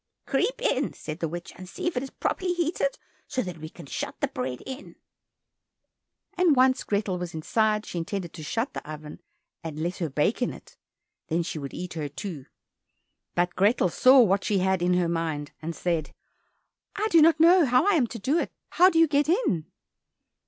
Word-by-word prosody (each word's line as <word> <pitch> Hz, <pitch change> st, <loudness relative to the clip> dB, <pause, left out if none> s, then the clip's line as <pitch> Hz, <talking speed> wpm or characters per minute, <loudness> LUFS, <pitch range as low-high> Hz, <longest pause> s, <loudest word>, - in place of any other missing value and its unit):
"Creep -, -, 0 dB
in," -, -, 0 dB
said 155 Hz, +2 st, -7 dB
the 165 Hz, -, -1 dB
witch, 175 Hz, +2 st, -7 dB
"and 185 Hz, 0 st, -10 dB
see -, -, -6 dB
if 350 Hz, -, 0 dB
it 250 Hz, -, 0 dB
is 270 Hz, -, -6 dB
properly 365 Hz, +5 st, -1 dB
heated, 355 Hz, +9 st, -1 dB, 0.3 s
so 255 Hz, -, -1 dB
that 180 Hz, -4 st, -7 dB
we 155 Hz, 0 st, -7 dB
can 170 Hz, -1 st, -12 dB
shut -, -, -5 dB
the -, -, +1 dB
bread 125 Hz, 0 st, -4 dB
in." 265 Hz, +1 st, -8 dB, 1.4 s
And 355 Hz, -5 st, +4 dB
when 260 Hz, +1 st, +6 dB
once 255 Hz, -, -2 dB
Grethel 200 Hz, -3 st, -1 dB
was 175 Hz, -2 st, -5 dB
inside, 215 Hz, +6 st, +1 dB
she 175 Hz, -, -4 dB
intended 175 Hz, 0 st, -4 dB
to 165 Hz, -, -9 dB
shut 225 Hz, -, -2 dB
the -, -, -7 dB
oven 150 Hz, 0 st, -9 dB, 0.4 s
and 160 Hz, -2 st, -6 dB
let 170 Hz, +4 st, -2 dB
her 165 Hz, -3 st, -2 dB
bake 150 Hz, -, 0 dB
in 245 Hz, -, 0 dB
it, -, -, -14 dB, 0.5 s
and 165 Hz, -, +1 dB
then 170 Hz, -, +1 dB
she 160 Hz, -, -5 dB
would 140 Hz, -1 st, -7 dB
eat 180 Hz, -1 st, -5 dB
her, 155 Hz, -3 st, -4 dB
too. 145 Hz, -1 st, -7 dB, 0.9 s
But 175 Hz, 0 st, +1 dB
Grethel 200 Hz, -1 st, +3 dB
saw 260 Hz, +9 st, +6 dB
what 195 Hz, -3 st, +3 dB
she 205 Hz, -, +1 dB
had 190 Hz, -1 st, +1 dB
in 180 Hz, +1 st, +2 dB
her 180 Hz, -1 st, +2 dB
mind, 160 Hz, -3 st, -2 dB
and 165 Hz, +1 st, -4 dB
said, 165 Hz, -4 st, -1 dB, 0.9 s
"I 430 Hz, -, -1 dB
do 330 Hz, -, +7 dB
not 320 Hz, 0 st, +5 dB
know 340 Hz, +1 st, +7 dB
how 250 Hz, +5 st, +4 dB
I 410 Hz, -, +4 dB
am 280 Hz, -9 st, +3 dB
to 230 Hz, -, -7 dB
do 280 Hz, +11 st, +1 dB
it; -, -, -3 dB, 0.2 s
how 360 Hz, +2 st, +6 dB
do 330 Hz, -, -1 dB
you 330 Hz, 0 st, +6 dB
get 290 Hz, +1 st, +1 dB
in?" 325 Hz, -, +1 dB
190 Hz, 210 wpm, -26 LUFS, 165-270 Hz, 1.4 s, do